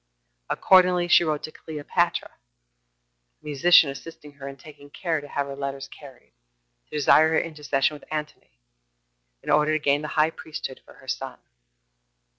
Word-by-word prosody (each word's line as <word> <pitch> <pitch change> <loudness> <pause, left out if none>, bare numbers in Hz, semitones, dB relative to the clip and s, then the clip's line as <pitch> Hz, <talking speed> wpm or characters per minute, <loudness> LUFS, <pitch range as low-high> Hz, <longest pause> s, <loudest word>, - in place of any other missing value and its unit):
Accordingly, 180 -2 +4
she 175 - +6
wrote 155 -3 -2
to 155 - -6
Cleopatra 150 -2 -2
[a - - -38
musician 150 +1 +5
assisting 150 +1 -11
her 140 -1 -10
in 135 0 -8
taking 145 0 -14
care 160 0 -2
to 145 - -11
have 140 0 -2
her 140 0 -7
letters 140 0 -5
carried] 135 -4 -15 0.5
to - - -40
desire 155 +2 +5
her 160 - +2
intercession 150 -3 -1
with - - -21
Antony, 150 - -6 0.9
in - - -3
order 150 +1 +3
to 155 - +1
gain 145 -1 +1
the 150 - -5
high 155 +1 +4
priesthood 155 -5 -8
for - - -17
her - - -18
son. - - -4
145 Hz, 160 wpm, -24 LUFS, 135-155 Hz, 0.9 s, she